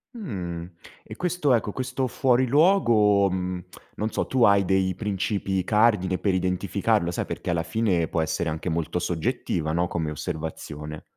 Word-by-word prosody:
Mhmm, 90 Hz, -, -5 dB, 0.3 s
e -, -, -10 dB
questo 180 Hz, -6 st, +1 dB
ecco, 105 Hz, -3 st, 0 dB
questo 130 Hz, 0 st, -2 dB
fuori 130 Hz, +1 st, +2 dB
luogo, 115 Hz, -, +4 dB
mhmm, 90 Hz, 0 st, -3 dB, 0.3 s
non 110 Hz, +1 st, -2 dB
so, -, -, -2 dB
tu 130 Hz, -3 st, +1 dB
hai 100 Hz, -2 st, +5 dB
dei 95 Hz, -1 st, +1 dB
princìpi 95 Hz, -2 st, -1 dB
cardine 105 Hz, -4 st, +3 dB
per 100 Hz, -3 st, 0 dB
identificarlo? 90 Hz, -1 st, 0 dB
Sai -, -, -2 dB
perché -, -, -5 dB
alla 85 Hz, -1 st, 0 dB
fine 95 Hz, -8 st, 0 dB
può 80 Hz, -, -1 dB
essere 80 Hz, +1 st, -1 dB
anche 80 Hz, +3 st, -3 dB
molto 85 Hz, +2 st, -1 dB
soggettiva, 80 Hz, -2 st, -2 dB
no, 85 Hz, +1 st, +1 dB
come 80 Hz, -3 st, -2 dB
osservazione. 75 Hz, 0 st, -6 dB
95 Hz, 155 wpm, -25 LUFS, 85-115 Hz, 0.3 s, hai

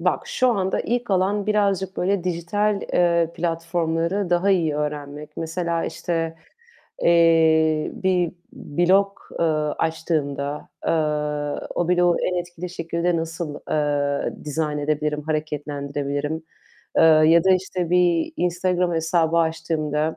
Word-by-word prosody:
Bak, 180 Hz, +1 st, 0 dB
şu 255 Hz, -, +1 dB
anda 195 Hz, -5 st, 0 dB
ilk 240 Hz, -1 st, -2 dB
olan 195 Hz, +2 st, +1 dB
birazcık 195 Hz, -3 st, +1 dB
böyle 185 Hz, 0 st, 0 dB
dijital, 195 Hz, +4 st, 0 dB
eee, 170 Hz, -2 st, +3 dB
platformları 170 Hz, +2 st, -1 dB
daha 175 Hz, +3 st, +3 dB
iyi 165 Hz, -6 st, +2 dB
öğrenmek. 150 Hz, 0 st, -5 dB
Mesela 165 Hz, 0 st, -2 dB
işte, 165 Hz, -1 st, -2 dB, 0.7 s
eee, 160 Hz, -2 st, +4 dB
bir 185 Hz, -6 st, 0 dB, 0.2 s
blog, 190 Hz, +6 st, +2 dB, 0.3 s
eee, -, -, +3 dB, 0.3 s
açtığımda, 150 Hz, -3 st, -2 dB, 0.2 s
eee, -, -, +2 dB, 0.8 s
o 175 Hz, 0 st, -1 dB
bloğu 175 Hz, -1 st, +3 dB
en 180 Hz, -, 0 dB
etkili 175 Hz, 0 st, -7 dB
şekilde 170 Hz, 0 st, -1 dB
nasıl, 165 Hz, -2 st, -4 dB
eee, 145 Hz, -1 st, -1 dB
dizayn 150 Hz, 0 st, -2 dB
edebilirim, 150 Hz, 0 st, -1 dB
hareketlendirebilirim? 145 Hz, 0 st, -3 dB, 0.5 s
Eee, -, -, +5 dB
ya 160 Hz, +1 st, +6 dB
da 190 Hz, -, +4 dB
işte 185 Hz, -2 st, 0 dB
bir 175 Hz, -2 st, +2 dB
Instagram 180 Hz, 0 st, 0 dB
hesabı 165 Hz, 0 st, +1 dB
açtığımda, 160 Hz, -2 st, -1 dB
165 Hz, 115 wpm, -23 LUFS, 155-180 Hz, 0.8 s, ya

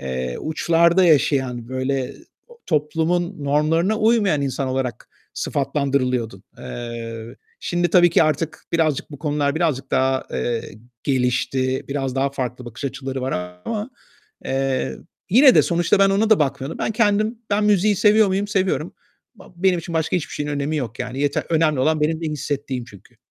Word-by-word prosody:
eee, 65 Hz, -2 st, -3 dB
uçlarda 170 Hz, +3 st, +3 dB
yaşayan, 135 Hz, -6 st, +2 dB
böyle 130 Hz, 0 st, -2 dB, 0.5 s
toplumun 165 Hz, +2 st, 0 dB
normlarına 165 Hz, +8 st, +2 dB
uymayan 215 Hz, -9 st, +3 dB
insan 135 Hz, -1 st, -2 dB
olarak 130 Hz, -2 st, -3 dB, 0.3 s
sıfatlandırılıyordun. 130 Hz, -7 st, -1 dB, 0.2 s
Eee, 115 Hz, -, -7 dB, 0.2 s
şimdi 175 Hz, -1 st, 0 dB
tabii 175 Hz, -1 st, +6 dB
ki 165 Hz, -, +4 dB
artık 155 Hz, +1 st, -1 dB
birazcık 160 Hz, -4 st, 0 dB
bu 145 Hz, -, -9 dB
konular 145 Hz, -1 st, 0 dB
birazcık 145 Hz, -5 st, -1 dB
daha, 130 Hz, 0 st, +1 dB
eee, 120 Hz, -2 st, -1 dB, 0.4 s
gelişti, 130 Hz, 0 st, 0 dB
biraz 135 Hz, -2 st, -2 dB
daha 135 Hz, +1 st, +1 dB
farklı 125 Hz, -2 st, -4 dB
bakış 120 Hz, +4 st, -9 dB
açıları 135 Hz, -1 st, -4 dB
var 130 Hz, +1 st, -2 dB, 0.3 s
ama, 220 Hz, +3 st, -3 dB, 0.5 s
eee, 135 Hz, 0 st, -1 dB, 0.3 s
yine 255 Hz, +6 st, +7 dB
de -, -, +6 dB
sonuçta 175 Hz, +2 st, +2 dB
ben 195 Hz, 0 st, +5 dB
ona 210 Hz, +3 st, +1 dB
da 220 Hz, -, +6 dB
bakmıyorum. 140 Hz, 0 st, -2 dB
Ben -, -, -1 dB
kendim, 215 Hz, +1 st, +1 dB
ben 210 Hz, +1 st, +2 dB
müziği 210 Hz, 0 st, +3 dB
seviyor 210 Hz, +1 st, +5 dB
muyum? 195 Hz, +2 st, -1 dB
Seviyorum. 185 Hz, -6 st, -1 dB, 0.4 s
Ba 195 Hz, -, -16 dB
benim 180 Hz, 0 st, +2 dB
için 170 Hz, 0 st, -6 dB
başka 160 Hz, +2 st, +1 dB
hiçbir 170 Hz, -, -4 dB
şeyin 145 Hz, 0 st, -3 dB
önemi 145 Hz, +2 st, -2 dB
yok, 125 Hz, -4 st, -4 dB
yani 130 Hz, +2 st, -4 dB
yeter, 145 Hz, 0 st, 0 dB
önemli 155 Hz, -4 st, +2 dB
olan 155 Hz, +3 st, +2 dB
benim 160 Hz, +1 st, 0 dB
ne 165 Hz, -, -3 dB
hissettiğim 140 Hz, -3 st, -3 dB
çünkü. 105 Hz, +1 st, -17 dB
145 Hz, 155 wpm, -21 LUFS, 130-175 Hz, 0.5 s, yine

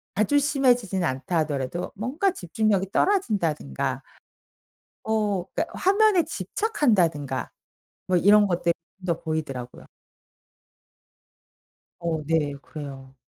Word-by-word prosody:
아주 215 Hz, +8 st, +3 dB
심해지진 245 Hz, -, +2 dB
않다 150 Hz, +4 st, -1 dB
하더라도 150 Hz, +2 st, -2 dB
뭔가 275 Hz, -, 0 dB
집중력이 195 Hz, -, 0 dB
떨어진다든가 190 Hz, -, 0 dB, 1.0 s
어 210 Hz, -4 st, 0 dB
그러니깐 -, -, -2 dB
화면에 400 Hz, -1 st, +4 dB
집착한다든가 185 Hz, -, 0 dB, 0.6 s
뭐 185 Hz, -, +3 dB
이런 205 Hz, +3 st, +6 dB
것들 170 Hz, -1 st, +1 dB, 0.3 s
더 170 Hz, -2 st, 0 dB
보이더라고요. 140 Hz, -6 st, -5 dB, 2.1 s
어 165 Hz, -2 st, -2 dB
네. 150 Hz, -2 st, +1 dB
그래요. 135 Hz, -4 st, -9 dB
185 Hz, 250 characters per minute, -25 LUFS, 155-235 Hz, 2.1 s, 이런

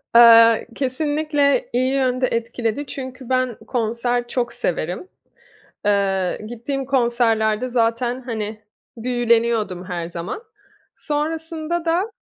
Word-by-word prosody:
Eee, 230 Hz, -1 st, +8 dB
kesinlikle 290 Hz, 0 st, +1 dB
iyi 255 Hz, +2 st, +1 dB
yönde 255 Hz, -1 st, +1 dB
etkiledi 230 Hz, +3 st, -2 dB
çünkü 260 Hz, -2 st, -8 dB
ben 255 Hz, -2 st, +1 dB
konser 240 Hz, +1 st, -1 dB
çok 240 Hz, -1 st, -2 dB
severim. 175 Hz, -, -3 dB, 0.8 s
Eee, 195 Hz, -3 st, +1 dB
gittiğim 250 Hz, +4 st, -4 dB
konserlerde 235 Hz, -3 st, +1 dB
zaten, 240 Hz, +1 st, 0 dB
hani, 220 Hz, -3 st, -5 dB, 0.4 s
büyüleniyordum 230 Hz, -5 st, +1 dB
her 175 Hz, -3 st, -4 dB
zaman. 175 Hz, -, -6 dB, 0.5 s
Sonrasında 320 Hz, +2 st, -3 dB
da, 360 Hz, +7 st, +1 dB
240 Hz, 100 wpm, -21 LUFS, 225-270 Hz, 0.8 s, Eee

